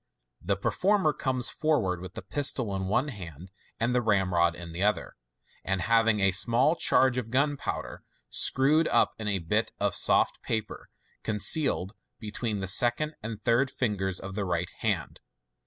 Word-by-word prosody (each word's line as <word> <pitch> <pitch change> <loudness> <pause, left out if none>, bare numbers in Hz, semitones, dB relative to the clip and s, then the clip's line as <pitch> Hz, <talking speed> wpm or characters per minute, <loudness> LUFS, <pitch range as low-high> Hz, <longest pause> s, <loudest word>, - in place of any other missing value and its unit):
The - - -1
performer 190 -5 +1
comes 130 -2 -1
forward 110 - -1
with 95 0 -10
the - - -7
pistol 120 -2 0
in 95 -1 -3
one 120 +9 0
hand 90 - -10 0.3
and 120 +2 0
the 125 - +2
ramrod 90 -6 +1
in 85 -1 -9
the 85 +3 -6
other, 105 +1 -1 0.5
and 95 0 -1
having 115 +2 +2
a 95 -1 +3
small 120 - +3
charge 130 -6 +3
of 115 -2 -7
gunpowder, 140 +3 -2 0.3
screw( 145 +5 +3
d - - -3
np - - +3
in 110 - -5
a 100 -1 +1
bit 85 -3 -2
of - - 0
soft - - +2
paper, 110 -2 -5 0.3
concealed 105 - +1 0.2
between 110 -1 -4
the 95 - -3
second 120 +10 +3
and 110 -1 -7
third 125 +3 +1
ringers 95 -6 -1
of 95 0 -8
his 105 - -2
right 90 -1 -3
hand. - - -3
110 Hz, 165 wpm, -27 LUFS, 95-130 Hz, 0.5 s, a